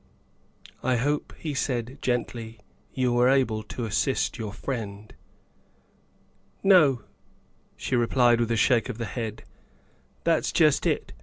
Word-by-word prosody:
I 130 0 +1
hope," 145 +5 -1
he 155 -3 -4
said 130 -1 -2
gently, 115 -2 -3 0.2
" - - -36
you 125 -2 +1
were 120 +1 +4
able 130 -5 +2
to 115 +2 -6
assist 120 +5 0
your 110 -2 -4
friend." 105 -3 -6 0.8
" 95 0 -38
No," 140 - +5 0.7
she 130 - -2
replied 120 0 +3
with 120 -1 0
a 115 - +1
shake 120 +1 +3
of 120 - -5
the 115 - -3
head, 110 -2 -5 0.4
" - - -37
that's - - +1
just - - +3
it. - - -1
120 Hz, 145 wpm, -26 LUFS, 110-130 Hz, 0.8 s, No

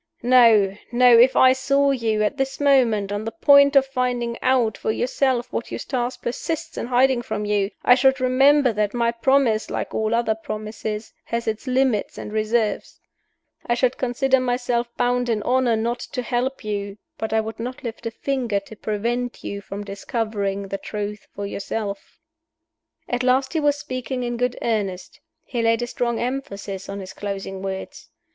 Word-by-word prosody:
No! 230 -6 +5 0.2
no! 245 0 +6
if 245 +3 +6
I 260 0 +6
saw 275 +1 +2
you, 225 -5 0
at 210 +7 -1
this 270 0 -2
moment, 240 -8 +3
on 205 +1 -2
the 225 - -4
point 280 +5 +5
of 275 -1 +6
finding 250 -3 -1
out 250 -5 +2
for - - -2
yourself 250 +1 0
what 235 - -3
Eustace 250 -2 -3
persists 315 +6 -4
in - - -4
hiding 255 0 +3
from 210 -3 -4
you, 205 -1 +1
I 245 - +7
should 265 +1 +3
remember 260 +1 +4
that 210 +1 -1
my 235 -1 +2
promise, 235 -1 +2
like - - -4
all 220 +1 0
other 230 -2 +1
promises, 215 0 -6
has 235 0 -3
its 220 +4 -3
limits 255 -4 +1
and 210 - -7
reserves. 220 0 -1 0.7
I 240 - +2
should 255 +1 +1
consider 265 +1 +2
myself 245 -1 0
bound 245 0 +1
in 215 -3 0
honor 250 -1 +2
not 235 +2 -1
to 250 - -5
help 250 +2 -2
you 205 -1 -4 0.2
but 220 - -3
I 220 - +3
would 220 0 -5
not 250 +3 -6
lift 230 -1 -5
a - - 0
finger 240 -3 -1
to 210 +2 -13
prevent 235 +4 -3
you 200 0 -5
from 200 +1 -7
discovering 200 -1 -3
the 195 - -3
truth 210 -1 -5
for 200 - -4
yourself." 200 0 -5 0.9
At 245 0 -1
last 260 +3 +2
he 325 - +1
was 290 -1 +2
speaking 255 -3 -4
in 240 0 -3
good 250 +1 -1
earnest: 200 -5 -2 0.3
he 240 -3 -2
laid 230 +1 +2
a - - 0
strong 240 -1 -2
emphasis 205 -7 -4
on 200 0 -5
his 190 0 -9
closing 195 -1 -5
words. 190 0 -6
235 Hz, 175 wpm, -22 LUFS, 215-255 Hz, 0.9 s, I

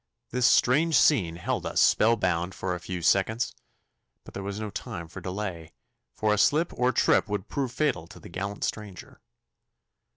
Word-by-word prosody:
This 125 0 +3
strange 155 +6 +3
scene 90 - +3
held 85 - -3
us - - -1
spell 115 +2 +4
bound 90 -3 -1
for 95 -1 -3
a 90 - -4
few 90 0 -6
seconds, 100 +7 +1 0.7
but - - -14
there 100 - -5
was 100 +1 -5
no 110 -1 -5
time 85 -4 -6
for 95 +3 -10
delay, 90 -4 -5 0.4
for 110 -1 +1
a 105 - 0
slip 155 +9 +2
or 125 +1 +1
trip - - +3
would 105 -2 -3
prove 135 -4 -2
fatal 125 - -1
to 105 - -13
the - - -12
gallant 100 +3 -5
stranger. 105 -4 -6
100 Hz, 175 wpm, -27 LUFS, 90-120 Hz, 0.7 s, spell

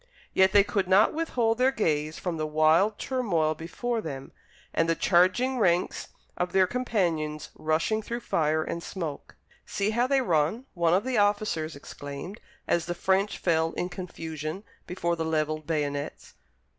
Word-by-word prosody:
Yet 190 0 +5
they 205 0 +6
could 195 -3 -1
not 195 +4 +5
withhold 245 -8 0
their 255 +1 +5
gaze 155 - -1
from 175 -3 -3
the 155 0 -2
wild 155 +7 +3
turmoil 180 -12 0
before 225 +9 -3
them, 135 -6 -7 0.4
and 165 0 +1
the 165 - +3
charging 205 +11 +3
ranks 180 -4 +1 0.3
of 180 - -2
their 190 -1 +5
companions 170 - -1
rushing 165 +8 0
through 235 +3 -5
fire 155 -4 +1
and 170 - -4
smoke. 165 -6 -6 0.3
"See 200 +1 -1
how 240 +3 +2
they 275 0 +3
run," 170 - +1
one 170 -1 +2
of 195 - +1
the 255 -3 0
officers 205 -7 +1
exclaimed, 145 +7 -8 0.3
as 170 -1 +1
the 175 - -2
French 190 +3 +1
fell 165 -1 +1
in 180 - -2
confusion 165 -1 -6 0.2
before 170 -1 -1
the 165 - -2
levelled 155 -1 -1
bayonets. 145 -3 -3
175 Hz, 155 wpm, -27 LUFS, 155-210 Hz, 0.4 s, they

